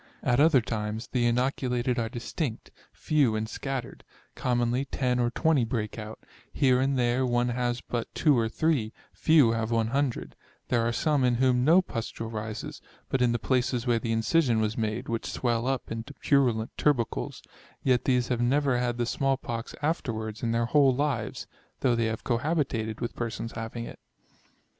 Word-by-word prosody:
At 125 Hz, 0 st, +2 dB
other 150 Hz, -3 st, +5 dB
times, 110 Hz, 0 st, -4 dB
the 120 Hz, -2 st, +2 dB
inoculated 125 Hz, 0 st, 0 dB
are 115 Hz, -1 st, -1 dB
distinct, 120 Hz, +2 st, -4 dB, 0.2 s
few 140 Hz, -8 st, +1 dB
and 110 Hz, 0 st, -2 dB
scattered; 130 Hz, +1 st, -5 dB, 0.3 s
commonly 120 Hz, +1 st, 0 dB
10 125 Hz, -2 st, -1 dB
or 120 Hz, -1 st, +2 dB
20 155 Hz, +1 st, +2 dB
break 110 Hz, -2 st, -3 dB
out; 110 Hz, 0 st, -8 dB, 0.3 s
here 130 Hz, -2 st, +3 dB
and 135 Hz, 0 st, +1 dB
there 120 Hz, +1 st, +2 dB
one 120 Hz, -1 st, +1 dB
has 120 Hz, 0 st, -1 dB
but 120 Hz, -2 st, -4 dB
2 150 Hz, -4 st, +4 dB
or 115 Hz, -2 st, +1 dB
3, 140 Hz, -6 st, 0 dB, 0.2 s
few 155 Hz, -8 st, +4 dB
have 115 Hz, -1 st, -1 dB
100: 120 Hz, +3 st, -1 dB, 0.3 s
there 120 Hz, -, +2 dB
are 115 Hz, +1 st, +1 dB
some 145 Hz, +2 st, +1 dB
in 125 Hz, -1 st, +3 dB
whom 125 Hz, 0 st, +3 dB
no 170 Hz, +7 st, +5 dB
pustule 115 Hz, -5 st, -5 dB
rises, 110 Hz, 0 st, -5 dB, 0.3 s
but 135 Hz, -, 0 dB
in 125 Hz, -1 st, +4 dB
the 120 Hz, -, +1 dB
places 125 Hz, 0 st, 0 dB
where 120 Hz, -2 st, +2 dB
the 115 Hz, 0 st, -3 dB
incision 115 Hz, +2 st, +2 dB
was 110 Hz, 0 st, 0 dB
made, 110 Hz, +2 st, -2 dB
which 115 Hz, -1 st, -3 dB
swell 120 Hz, -1 st, 0 dB
up 135 Hz, -2 st, -2 dB
into 115 Hz, +5 st, -6 dB
purulent 120 Hz, -6 st, +1 dB
tubercles; 120 Hz, -, 0 dB, 0.4 s
yet 125 Hz, -2 st, +2 dB
these 125 Hz, -2 st, +2 dB
have 120 Hz, -2 st, 0 dB
never 135 Hz, +1 st, +2 dB
had 120 Hz, -1 st, -1 dB
the 120 Hz, -, 0 dB
small 135 Hz, +2 st, 0 dB
pox 115 Hz, -1 st, -5 dB
afterwards 110 Hz, -9 st, -2 dB
in 115 Hz, -, -1 dB
their 115 Hz, 0 st, +1 dB
whole 135 Hz, +1 st, +4 dB
lives; 135 Hz, -6 st, -2 dB, 0.4 s
though 125 Hz, -, +3 dB
they 115 Hz, -1 st, +1 dB
have 110 Hz, 0 st, -3 dB
cohabited 120 Hz, -4 st, -1 dB
with 120 Hz, -, -3 dB
persons 115 Hz, -1 st, -4 dB
having 115 Hz, +1 st, -5 dB
it. -, -, -10 dB
120 Hz, 175 wpm, -27 LUFS, 115-130 Hz, 0.4 s, other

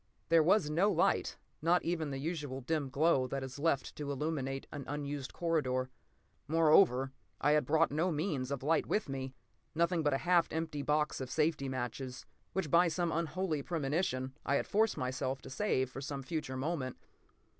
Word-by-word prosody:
There 165 Hz, -1 st, +6 dB
was 170 Hz, +1 st, +4 dB
no 170 Hz, +7 st, +3 dB
light, -, -, +1 dB, 0.2 s
not 170 Hz, +2 st, +3 dB
even 165 Hz, -3 st, -1 dB
the 135 Hz, -, -3 dB
usual 145 Hz, -3 st, -3 dB
dim 145 Hz, +1 st, -1 dB
glow 140 Hz, -2 st, +3 dB
that 135 Hz, +1 st, -3 dB
is 135 Hz, +1 st, -7 dB
left 140 Hz, -4 st, 0 dB
to 145 Hz, -1 st, -3 dB
illuminate 135 Hz, -2 st, -2 dB
an 145 Hz, -2 st, -5 dB
unused 145 Hz, -1 st, -4 dB
corridor. 130 Hz, -7 st, 0 dB, 0.6 s
Moreover, 155 Hz, -4 st, +4 dB, 0.3 s
I 145 Hz, -, +3 dB
had 150 Hz, -4 st, +3 dB
brought 160 Hz, +1 st, +3 dB
no 165 Hz, +5 st, +1 dB
means 150 Hz, -5 st, -1 dB
of 140 Hz, -2 st, -3 dB
light 160 Hz, +3 st, +2 dB
with 215 Hz, -, 0 dB
me—nothing 150 Hz, +5 st, -3 dB
but 145 Hz, -3 st, +2 dB
a 135 Hz, -, -4 dB
half 175 Hz, -1 st, +4 dB
empty 160 Hz, -2 st, -3 dB
box 150 Hz, 0 st, 0 dB
of 130 Hz, -, -4 dB
safety 150 Hz, -3 st, +1 dB
matches 130 Hz, 0 st, -4 dB, 0.3 s
which, 180 Hz, -7 st, -2 dB
by 175 Hz, +1 st, +6 dB
some 170 Hz, +1 st, 0 dB
unholy 165 Hz, -1 st, -1 dB
premonition, 140 Hz, -4 st, -1 dB
I 140 Hz, -, +1 dB
had -, -, +1 dB
forced 220 Hz, +2 st, +2 dB
myself 130 Hz, +1 st, -2 dB
to -, -, -9 dB
save 130 Hz, -6 st, 0 dB
for 135 Hz, -, -6 dB
some 140 Hz, 0 st, -4 dB
future 130 Hz, -2 st, -3 dB
moment. 135 Hz, -2 st, -2 dB
150 Hz, 175 wpm, -33 LUFS, 135-165 Hz, 0.6 s, There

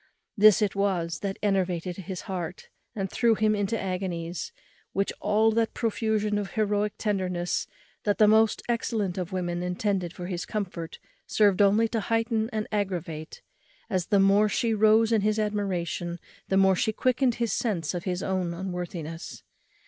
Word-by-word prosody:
This 215 Hz, -1 st, +6 dB
it 200 Hz, -, 0 dB
was 175 Hz, -5 st, 0 dB
that 195 Hz, -1 st, -3 dB
enervated 185 Hz, -3 st, 0 dB
his 190 Hz, -1 st, -6 dB
heart, 180 Hz, -2 st, -5 dB, 0.3 s
and 195 Hz, -2 st, -2 dB
threw 230 Hz, +3 st, +2 dB
him 215 Hz, 0 st, +2 dB
into 210 Hz, +2 st, -1 dB
agonies, 180 Hz, -3 st, -3 dB, 0.4 s
which 195 Hz, 0 st, 0 dB
all 215 Hz, +2 st, +3 dB
that 225 Hz, 0 st, 0 dB
profusion 215 Hz, -2 st, 0 dB
of 200 Hz, -1 st, -5 dB
heroic 210 Hz, -1 st, 0 dB
tenderness 185 Hz, -4 st, -1 dB, 0.4 s
that 205 Hz, -1 st, +1 dB
the 215 Hz, -, +6 dB
most 220 Hz, 0 st, +4 dB
excellent 220 Hz, -6 st, -1 dB
of 180 Hz, -2 st, -4 dB
women 175 Hz, -2 st, -2 dB
intended 180 Hz, 0 st, -1 dB
for 175 Hz, 0 st, -7 dB
his 175 Hz, -1 st, -3 dB
comfort 180 Hz, -6 st, -5 dB, 0.3 s
served 205 Hz, -2 st, +3 dB
only 205 Hz, +3 st, +4 dB
to 225 Hz, -, -1 dB
heighten 225 Hz, 0 st, 0 dB
and 215 Hz, -1 st, -2 dB
aggravate; 175 Hz, -6 st, -3 dB, 0.5 s
as 185 Hz, -3 st, 0 dB
the 200 Hz, -3 st, +3 dB
more 200 Hz, +2 st, +5 dB
she 225 Hz, +2 st, +1 dB
rose 220 Hz, +1 st, +4 dB
in 225 Hz, -2 st, +3 dB
his 215 Hz, +1 st, +1 dB
admiration, 185 Hz, -5 st, -2 dB, 0.3 s
the 190 Hz, -, +1 dB
more 190 Hz, -1 st, +5 dB
she 220 Hz, -, +1 dB
quickened 250 Hz, +2 st, +1 dB
his 235 Hz, -4 st, -1 dB
sense 185 Hz, -10 st, -1 dB
of 175 Hz, -1 st, -4 dB
his 180 Hz, -1 st, -2 dB
own 185 Hz, -3 st, -1 dB
unworthiness. 175 Hz, -3 st, -6 dB
200 Hz, 160 wpm, -27 LUFS, 180-215 Hz, 0.5 s, This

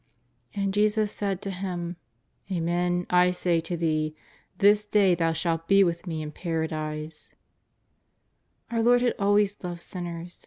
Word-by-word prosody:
And 200 Hz, -1 st, -1 dB
Jesus 210 Hz, 0 st, +2 dB
said 195 Hz, -2 st, -3 dB
to 195 Hz, -, -3 dB
him: 180 Hz, -2 st, -4 dB, 0.5 s
''Amen, 175 Hz, 0 st, 0 dB
I 180 Hz, 0 st, +5 dB
say 175 Hz, -2 st, +1 dB
to 170 Hz, +1 st, -4 dB
thee, 155 Hz, -2 st, 0 dB, 0.4 s
this 205 Hz, +2 st, +5 dB
day 205 Hz, -3 st, +3 dB
thou 165 Hz, -1 st, +1 dB
shalt 165 Hz, 0 st, -1 dB
he 195 Hz, 0 st, +7 dB
with 170 Hz, 0 st, -1 dB
Me 160 Hz, -2 st, -3 dB
in 150 Hz, -, -6 dB
Paradise/' 155 Hz, -2 st, -3 dB, 1.4 s
Our 230 Hz, -1 st, +1 dB
Lord 245 Hz, +1 st, +4 dB
had 245 Hz, -, +2 dB
always 205 Hz, 0 st, +2 dB
loved 175 Hz, -1 st, -5 dB
sinners. 175 Hz, -1 st, -6 dB
180 Hz, 145 wpm, -26 LUFS, 165-200 Hz, 1.4 s, he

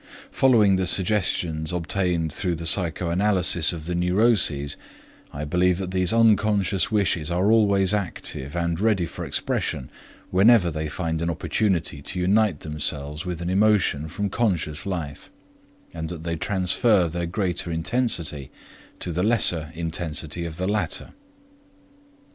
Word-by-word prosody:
Following 110 Hz, -8 st, +4 dB
the 95 Hz, -1 st, -1 dB
suggestions 90 Hz, -5 st, 0 dB
obtained 90 Hz, -2 st, -1 dB
through 90 Hz, -3 st, -2 dB
the 85 Hz, +1 st, -7 dB
psychoanalysis 90 Hz, 0 st, +2 dB
of 80 Hz, -3 st, -7 dB
the 90 Hz, -, -3 dB
neuroses, 90 Hz, -5 st, +1 dB, 0.6 s
I 75 Hz, +1 st, -5 dB
believe 90 Hz, +3 st, +1 dB
that 95 Hz, -1 st, -4 dB
these 95 Hz, -1 st, +2 dB
unconscious 105 Hz, -4 st, +2 dB
wishes 95 Hz, -7 st, 0 dB
are 90 Hz, +5 st, +1 dB
always 100 Hz, -3 st, +3 dB
active 90 Hz, -7 st, -4 dB
and 85 Hz, -1 st, -1 dB
ready 105 Hz, -4 st, +1 dB
for -, -, -8 dB
expression 65 Hz, -, -3 dB, 0.4 s
whenever 95 Hz, -2 st, +5 dB
they 75 Hz, 0 st, -4 dB
find 80 Hz, 0 st, -3 dB
an 85 Hz, -, -1 dB
opportunity 85 Hz, -1 st, -1 dB
to 90 Hz, +6 st, -3 dB
unite 95 Hz, -2 st, +2 dB
themselves 75 Hz, +1 st, -4 dB
with 85 Hz, -1 st, -4 dB
an 85 Hz, -, -3 dB
emotion 95 Hz, -7 st, +2 dB
from 100 Hz, +5 st, -4 dB
conscious 90 Hz, -7 st, -1 dB
life, 80 Hz, -7 st, -5 dB, 0.6 s
and 80 Hz, -1 st, -5 dB
that 85 Hz, -2 st, -7 dB
they 85 Hz, 0 st, -2 dB
transfer 90 Hz, +2 st, +2 dB
their 85 Hz, +1 st, -3 dB
greater 90 Hz, -2 st, -2 dB
intensity 80 Hz, -, -1 dB, 0.5 s
to 90 Hz, -, -2 dB
the 85 Hz, +2 st, -1 dB
lesser 90 Hz, -7 st, +3 dB
intensity 80 Hz, 0 st, -4 dB
of 80 Hz, -1 st, -7 dB
the 95 Hz, +1 st, -2 dB
latter. 105 Hz, 0 st, -2 dB
90 Hz, 135 wpm, -24 LUFS, 80-100 Hz, 0.6 s, whenever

